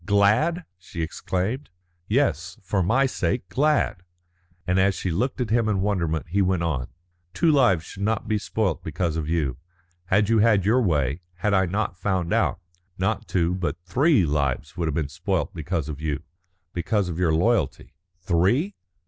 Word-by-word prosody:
"Glad!" 110 - +2
she 85 -2 -5
exclaimed. 95 - -3 0.4
"Yes, 95 - 0
for 95 +1 0
my 125 +10 +3
sake, 125 -5 -1
glad." 145 -4 +1 0.6
And 90 +1 +2
as 95 0 +3
she 90 - -2
looked 125 +11 -1
at 120 -4 -2
him 115 -1 +2
in 100 -3 +1
wonderment 85 -5 -1
he 100 +4 +1
went 95 -2 +1
on: 70 -7 -1 0.5
"Two 165 - +3
lives 120 - +4
should 100 - -10
not 110 +1 0
be 110 -1 +1
spoilt 105 -4 -1
because 80 +1 -2
of 80 -1 -3
you. 75 -7 0 0.5
Had 100 +3 +2
you 115 0 +3
had 105 -3 +4
your 120 +5 +4
way, 75 - 0
had 105 +4 0
I 95 -1 +3
not 100 +1 -1
found 90 -3 0
out, - - +1 0.4
not 100 +4 -1
two 85 -1 +1
but 90 -2 -2
three 130 - +3
lives 70 -2 -1
would 85 -2 -1
have 75 - -2
been 75 -3 0
spoilt 70 - -2
because 80 -1 -3
of 75 -1 -6
you 75 -3 -2 0.5
because 95 +3 0
of 85 -1 -4
your 85 -3 +2
loyalty." 90 - 0 0.3
"Three?" 95 - +2
95 Hz, 175 wpm, -24 LUFS, 85-110 Hz, 0.6 s, lives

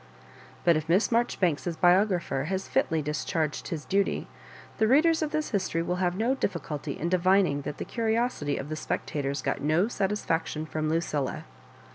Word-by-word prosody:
But 170 -1 +5
if 155 +1 -2
Miss 190 +8 +3
Marjoribanks's 180 -8 +1
biographer 175 -6 +3
has 190 +3 -2
fitly 160 -1 +1
discharged 150 +1 -2
his 160 -4 -5
duty, 200 0 0 0.5
the 220 - +4
readers 320 +6 +4
of 310 - 0
this 310 0 -2
history 185 -5 0
will 180 +1 -1
have 180 -1 0
no 235 +5 +2
difficulty 170 - -3
in 165 - -2
divining 185 -4 +3
that 145 - -5
the - - -5
curiosity 225 - 0
of 135 - -5
the 155 - -3
^ - - -8
spectators 140 -1 -3
got - - -1
no 155 +7 +2
satisfaction 180 -8 -1
from 155 0 -2
Lucilla. 155 -4 -1
175 Hz, 165 wpm, -28 LUFS, 155-205 Hz, 0.5 s, But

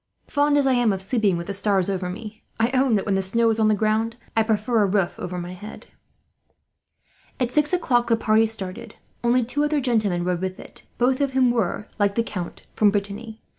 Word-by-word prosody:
Fond 290 0 +2
as 285 - +3
I 265 - +3
am 245 -3 +3
of 190 - -2
sleeping 200 -2 +1
with 170 - -5
the 200 - -4
stars 195 -2 +1
over 185 -2 -2
me; 215 +3 -8 0.2
I 230 +2 +2
own 260 -3 +3
that, 200 - 0
when 200 - 0
the 195 - +1
snow 230 +4 +2
is 220 - -2
on 220 - +4
the 215 - +3
ground, 220 +2 0 0.2
I 225 - +4
prefer 220 +1 +1
a 205 - +3
roof 190 -2 +1
over 180 0 -5
my 175 +1 -5
head." 205 +4 -10 1.5
At 250 -2 0
six 295 +1 +2
o'clock 245 -10 +1
the 230 -1 +3
party 220 0 +3
started. 220 +1 -6 0.3
Only 240 0 +3
two 290 +5 -1
other 295 0 +1
gentlemen 215 -9 0
rode 180 0 -1
with 185 0 -4
it, - - -13
both 255 +3 +2
of 275 -2 0
whom 255 -2 +4
were, 215 -2 -1
like 200 -1 +2
the 230 - +2
Count, 180 -6 -6
from 210 - +4
Brittany. 205 +2 -4
220 Hz, 220 wpm, -23 LUFS, 195-240 Hz, 1.5 s, on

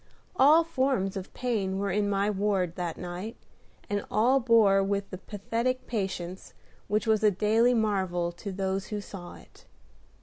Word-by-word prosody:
All 310 +2 +6
forms 265 -11 0
of 190 -1 -6
pain 210 -7 -1
were 200 -1 -1
in 205 +2 +1
my 200 0 +1
ward 195 -4 0
that 175 -3 -4
night, 180 +6 -6 0.5
and 205 0 -2
all 250 +5 +3
borne 210 -5 +4
with 200 -1 -1
the 185 - -6
pathetic 230 +6 -2
patience 190 -4 -4 0.3
which 210 +3 0
was 220 -1 +2
a 210 - +7
daily 220 +5 +3
marvel 190 -6 0
to 195 +4 -7
those 190 0 -2
who 210 - -3
saw 190 -3 -9
it. - - -18
205 Hz, 160 wpm, -28 LUFS, 190-225 Hz, 0.5 s, a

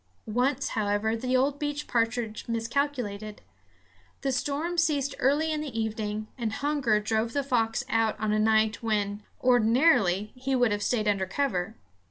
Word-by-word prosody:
Once, 250 +5 0
however, 210 +1 0
the 255 +3 0
old 280 +2 +1
beech 290 0 -3
partridge 230 -2 -1
miscalculated. 230 -3 -2 0.8
The 270 - 0
storm 290 +7 -1
ceased 290 -4 +1
early 295 +4 +2
in 305 -1 -1
the 275 -7 -4
evening, 215 -1 -3
and 225 -3 -2
hunger 280 -6 +1
drove 220 +2 -1
the 285 - 0
fox 240 -2 0
out 225 -3 +1
on 215 0 0
a 215 - +2
night 220 +1 +2
when, 210 -2 -1 0.2
ordinarily, 230 - +3
he 265 +1 -2
would 245 -3 +3
have 205 0 -1
stayed 215 0 0
under 195 -2 +1
cover. 220 -4 -1
230 Hz, 155 wpm, -27 LUFS, 215-275 Hz, 0.8 s, ordinarily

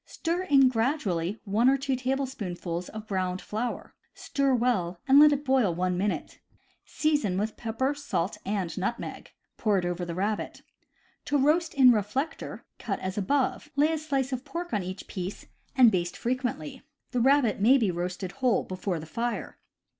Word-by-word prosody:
Stir 335 +2 -2
in 280 -7 +5
gradually 225 - 0
one 220 +5 +3
or 275 - +4
two 270 -1 -1
tablespoonfuls 230 -10 -3
of 215 0 -8
browned 185 -2 -2
flour; 230 +5 -4 0.2
stir 275 -2 0
well, 195 -8 0
and 275 +1 +7
let 300 0 +8
it 290 0 -1
boil 255 -10 +2
one 180 +1 0
minute. 200 +3 -2 0.5
Season 290 -12 0
with 215 +2 -2
pepper, 240 +4 -1
salt, 280 -10 -3
and 195 -4 -2
nutmeg. 235 +6 -4 0.3
Pour 210 -3 +2
it 180 - -1
over 175 0 -2
the 170 -1 -4
rabbit. 205 +3 -2 0.6
To 290 - +1
roast 315 +4 +2
in 260 -2 +8
reflector: 235 +8 -2
cut 200 -4 -3
as 185 +1 -4
above, 265 +8 0
lay 295 +3 +3
a - - 0
slice 275 -3 -1
of 250 0 -3
pork 340 +5 -6
on 205 - +1
each 185 +1 -6
piece, 185 0 -6 0.3
and 250 -4 +7
baste 175 -2 -1
frequently. 245 - -3 0.3
The 245 - 0
rabbit 265 -4 +3
may 250 +6 +6
be 220 -7 +1
roasted 180 +1 -4
whole 255 -2 +1
before 185 -1 -3
the 155 - -8
fire. 235 +8 -4
230 Hz, 170 wpm, -27 LUFS, 185-270 Hz, 0.6 s, let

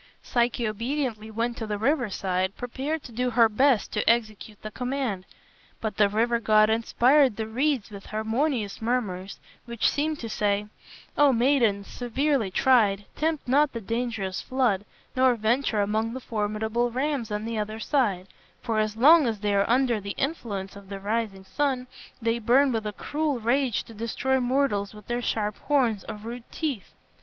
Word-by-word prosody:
Psyche 240 -1 0
obediently 230 0 -3
went 230 +2 -2
to 225 - -4
the 210 -1 -2
riverside, 200 -7 0
prepared 270 +5 -3
to - - -10
do 250 +2 -1
her 230 -1 +5
best 245 +1 +2
to - - +1
execute 215 -2 0
the 215 - -6
command. 250 -6 -3 0.5
But 215 -3 -4
the 205 -1 +4
river 230 +3 +1
god 215 -1 +4
inspired 245 +3 +3
the 220 - -3
reeds 245 0 -1
with 200 -1 -10
harmonious 220 0 -1
murmurs, 205 -6 -2 0.3
which 235 -2 0
seemed 305 +1 0
to 230 - -4
say, 205 -1 0 0.5
"O 290 -1 +6
maiden, 235 -5 +2
severely 250 0 -1
tried, 205 -3 +3
tempt 310 -3 -1
not 285 +3 +3
the 230 - -3
dangerous 225 -3 -3
flood, 240 -7 0 0.3
nor 255 -1 +4
venture 225 0 +1
among 220 +3 -1
the 260 - -4
formidable 220 +1 -1
rams 260 -1 -2
on 210 +1 -3
the 225 -1 -2
other 215 +1 -4
side, 225 -9 0 0.4
for 225 -3 0
as 215 0 -1
long 300 +3 +7
as 220 -3 -2
they 205 -1 0
are 200 +1 +2
under 245 -3 +2
the 200 0 -5
influence 215 -10 -3
of 200 -1 -13
the 200 -1 -6
rising 205 -1 -2
sun, 260 +4 -1 0.3
they 230 0 0
burn 255 +5 +4
with 220 -2 -2
a 210 - -4
cruel 295 +2 -2
rage 245 +1 +1
to 230 - -13
destroy 235 +4 -1
mortals 245 -6 0
with 210 -1 -13
their 240 0 -2
sharp 210 -3 -1
horns 245 -8 +1
or - - -4
rude 230 +3 -9
teeth. 285 - -4
230 Hz, 170 wpm, -26 LUFS, 210-260 Hz, 0.5 s, long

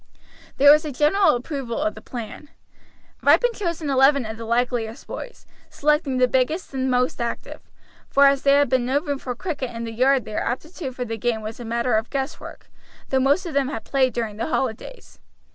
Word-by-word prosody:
There 285 +1 +8
was 300 +1 +5
a 305 - -4
general 305 +6 +3
approval 250 -2 -4
of 315 +2 0
the - - -12
plan. 245 +4 -8 0.7
Ripon - - +4
chose 345 -6 -3
an 290 - -1
eleven 270 0 +4
of 220 0 -5
the 230 - -7
likeliest 235 0 -1
boys, - - -8 0.2
selecting 300 -2 +1
the 255 0 +4
biggest 265 +7 -1
and 260 0 -1
most 250 -1 0
active; 235 - -5 0.5
for 280 0 +5
as 275 -1 +4
there 280 0 +4
had 285 -2 +3
been 250 -1 +1
no 270 +3 +2
room 285 -3 -4
for 250 -2 -5
cricket 280 -4 -4
in 230 -1 -6
the 230 - -5
yard 255 +2 +2
their 215 0 -3
aptitude 270 +1 -4
for 250 - -3
the 225 -1 -4
game 230 0 -1
was 215 +2 -7
a 240 - -7
matter 235 +1 -1
of 220 +1 0
guesswork, 270 +1 -5 0.4
though 265 - +2
most 285 +8 +2
of 335 - -5
them 275 -1 +1
had 225 -5 -5
played 265 -2 +1
during 225 -4 -4
the 225 - -2
holidays. 270 - -4
260 Hz, 205 wpm, -23 LUFS, 240-290 Hz, 0.7 s, There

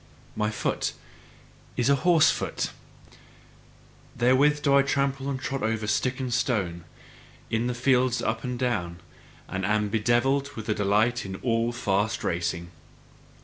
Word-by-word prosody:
My 105 0 0
foot 110 - -2 0.8
is 120 - +1
a 140 - +5
horse 170 -3 +5
foot; - - -3 1.4
therewith 135 +5 +3
do 140 - +3
I 140 - +7
trample 140 0 -1
and 135 -2 -2
trot 135 0 -3
over 110 -1 -1
stick 125 +5 0
and 130 -2 -2
stone, 100 -10 -1 0.7
in 115 +2 0
the 125 - -2
fields 130 0 +2
up 110 +1 -2
and 125 -1 -3
down, 90 -9 -2 0.5
and 95 0 -4
am 105 +1 +1
bedevilled 120 +6 +1
with 110 -1 -2
delight 105 +4 +2
in 95 -1 -6
all 115 -1 +1
fast 105 -3 -1
racing. 85 0 -2
120 Hz, 140 wpm, -26 LUFS, 105-130 Hz, 1.4 s, I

